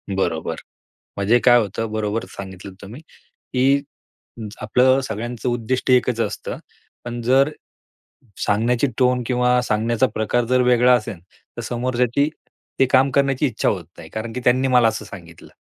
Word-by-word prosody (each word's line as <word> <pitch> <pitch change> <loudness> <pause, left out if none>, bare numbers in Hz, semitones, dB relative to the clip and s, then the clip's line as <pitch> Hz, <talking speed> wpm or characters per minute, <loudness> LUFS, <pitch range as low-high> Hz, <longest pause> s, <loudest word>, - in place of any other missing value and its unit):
बरोबर. 80 -4 -1 0.6
म्हणजे 105 +5 +3
काय 120 -1 +7
होतं 110 0 -2
बरोबर 110 0 -2
सांगितलंत 95 0 -9
तुम्ही. 110 +8 -10 0.5
की 135 +2 +3 0.8
आपलं 130 +4 +3
सगळ्यांचं 120 +3 -4
उद्दिष्ट 120 +2 -1
एकच 125 -2 +3
असतं. - - -3 0.5
पण 120 0 -5
जर 135 +4 +3 1.0
सांगण्याची 115 +5 +1
टोन 125 -1 +2
किंवा 125 0 +2
सांगण्याचा 115 +2 +1
प्रकार 115 +3 0
जर 125 +2 +2
वेगळा 125 0 +4
असेन 115 -5 -2 0.4
तर - - -5
समोरच्याची 125 +3 0 0.5
ते 135 - +6
काम 135 +1 +4
करण्याची 140 +1 +1
इच्छा 120 -5 -1
होत 90 -4 -1
नाही 80 -1 -10
कारण 115 +1 -5
की 125 - -4
त्यांनी 130 +2 +3
मला 125 -3 +5
असं 110 - -4
सांगितलं 85 -4 -12
120 Hz, 140 wpm, -21 LUFS, 110-125 Hz, 1.0 s, काय